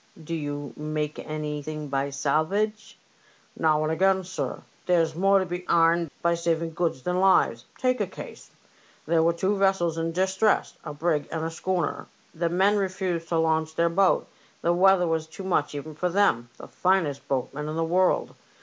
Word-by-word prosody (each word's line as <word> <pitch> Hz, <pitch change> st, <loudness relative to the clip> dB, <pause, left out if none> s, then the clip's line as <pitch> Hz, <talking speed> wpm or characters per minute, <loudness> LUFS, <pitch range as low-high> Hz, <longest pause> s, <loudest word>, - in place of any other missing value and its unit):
" 160 Hz, -, -15 dB
Do -, -, -2 dB
you 145 Hz, -2 st, -4 dB
make 150 Hz, 0 st, -3 dB
anything 150 Hz, 0 st, -5 dB
by 135 Hz, 0 st, -1 dB
salvage? 155 Hz, +10 st, -1 dB, 0.2 s
" -, -, -31 dB
'* -, -, -33 dB
Now 155 Hz, -1 st, +2 dB
and 155 Hz, -, 0 dB
again, 190 Hz, +3 st, +2 dB
sir. 190 Hz, +1 st, -5 dB, 0.2 s
There's 165 Hz, -3 st, +3 dB
more 195 Hz, +4 st, +3 dB
to 190 Hz, -, +1 dB
be 180 Hz, 0 st, -5 dB
aimed 170 Hz, 0 st, +3 dB
by 170 Hz, 0 st, +3 dB
saving 165 Hz, -1 st, -1 dB
goods 160 Hz, -6 st, -1 dB
than 180 Hz, 0 st, 0 dB
lives. 185 Hz, -11 st, +3 dB
Take 255 Hz, -2 st, +1 dB
a 205 Hz, -, 0 dB
case: -, -, -10 dB, 0.6 s
There 165 Hz, +1 st, +2 dB
were 165 Hz, +1 st, +4 dB
two 190 Hz, +4 st, 0 dB
vessels 190 Hz, -4 st, +1 dB
in 165 Hz, 0 st, -1 dB
distress, 190 Hz, +4 st, +1 dB
a 150 Hz, -, -6 dB
brig 150 Hz, -1 st, -1 dB
and 160 Hz, -1 st, -2 dB
a 165 Hz, -, -3 dB
schooner. 175 Hz, 0 st, -2 dB, 0.3 s
The 170 Hz, +1 st, -1 dB
Deal 175 Hz, -, -3 dB
men 200 Hz, +2 st, +4 dB
refused 185 Hz, -4 st, -2 dB
to 170 Hz, -, +1 dB
launch 160 Hz, -1 st, +1 dB
their 170 Hz, +1 st, +2 dB
boat; 190 Hz, +3 st, +2 dB, 0.4 s
the 170 Hz, -, +3 dB
weather 185 Hz, 0 st, +5 dB
was 160 Hz, -1 st, -1 dB
too 165 Hz, +4 st, -9 dB
much 165 Hz, -6 st, 0 dB
even 155 Hz, +2 st, -6 dB
for 180 Hz, +4 st, -1 dB
them, 170 Hz, -11 st, +2 dB
the -, -, -10 dB
finest 175 Hz, -7 st, 0 dB
boatmen 140 Hz, +3 st, -2 dB
in 155 Hz, -, -4 dB
the 165 Hz, -, 0 dB
world. 180 Hz, +3 st, +1 dB
165 Hz, 190 wpm, -26 LUFS, 155-185 Hz, 0.6 s, weather